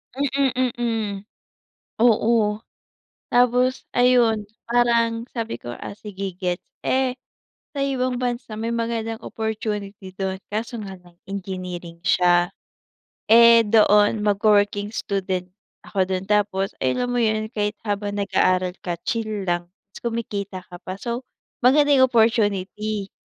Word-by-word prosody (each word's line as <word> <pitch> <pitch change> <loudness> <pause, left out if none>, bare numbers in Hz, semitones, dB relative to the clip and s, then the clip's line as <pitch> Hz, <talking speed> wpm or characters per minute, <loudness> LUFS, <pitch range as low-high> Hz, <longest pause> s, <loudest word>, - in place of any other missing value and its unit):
Mhm, 265 -2 +1
mhm, 235 -1 0 1.1
oo. 220 -2 +3 0.7
Tapos, 250 +1 +3
ayun, 245 -3 +4 0.2
parang 235 -1 +2
sabi 230 -1 -3
ko 120 - -7
"ah, - - -8
sige 195 -2 -6
gets." 180 -1 -2 0.2
Eh, 260 -1 +1 0.6
sa - - -1
ibang 255 -2 -1
bansa 240 -3 -3
may 230 +1 -2
magandang 230 -1 -2
opportunity 210 -3 -4
'dun. 190 -1 -3
Kaso 225 +2 -4
nga 195 -2 -7
lang 175 -1 -21
engineering 180 -3 -6
siya. 175 -1 +4 0.8
Eh, 235 0 +8
doon 210 0 +4
mag-wo-working 205 0 +2
student 185 -3 -2 0.4
ako 190 -2 0
'dun, 185 0 -2
tapos, 200 -2 +1
eh, 130 - +2
alam 245 0 -1
mo 245 - +1
'yun, 215 -1 +1
kahit 210 -1 -1
habang 205 -1 -2
nag-aaral 185 -2 +1
ka 175 -2 -3
chill 215 -3 -2
lang 175 0 -1 0.2
'tas - - -11
kumikita 205 -5 -4
ka 175 - -9
pa. 185 - -6
So, 240 +2 -4 0.4
maganda 290 +3 +5
yung 260 -1 +5
opportunity. 210 -3 +1
215 Hz, 125 wpm, -23 LUFS, 195-235 Hz, 1.1 s, Eh